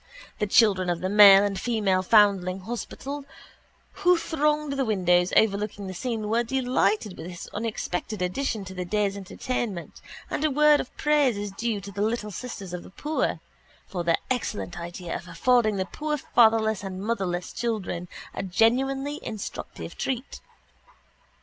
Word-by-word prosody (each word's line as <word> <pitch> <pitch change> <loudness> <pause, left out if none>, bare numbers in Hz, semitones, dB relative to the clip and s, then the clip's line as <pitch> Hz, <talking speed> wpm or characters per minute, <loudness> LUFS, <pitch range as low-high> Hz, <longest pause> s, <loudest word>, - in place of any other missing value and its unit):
The 210 - 0
children 195 -4 +4
of 170 -1 -1
the 185 - -1
Male 200 -1 +9
and 200 -2 -1
Female 205 -6 +1
Foundling 195 -2 +3
Hospital 255 +6 -6 0.8
who 360 -2 +5
thronged 300 -2 0
the 275 -1 0
windows 180 -5 +2
overlooking 205 -1 +1
the 190 - -5
scene 225 +1 -3
were 225 +2 +2
delighted 230 -5 0
with 160 - -8
this 175 -1 -8
unexpected 215 -2 -3
addition 200 +3 -2
to 190 - -8
the 180 -1 -4
day's 200 +2 0
entertainment 200 -1 -4 0.3
and - - -3
a 310 - +3
word 300 +1 +5
of - - -5
praise 290 -6 +2
is 205 0 -4
due 220 +1 -2
to 200 +1 -9
the 200 +1 -4
Little 215 0 -1
Sisters 195 -3 -7
of 180 - -4
the - - -13
Poor 300 +11 -2 0.4
for 180 -3 -4
their 170 -1 +3
excellent 210 -8 -3
idea 175 0 -6
of 180 - -7
affording 240 +1 +2
the 190 -1 -1
poor 300 +8 -3
fatherless 220 -5 +3
and 190 -1 -5
motherless 190 -5 -2
children 200 -7 -3 0.3
a - - -4
genuinely 270 +9 +1
instructive 215 -3 -7
treat. 260 0 -4
210 Hz, 155 wpm, -26 LUFS, 190-245 Hz, 0.8 s, Male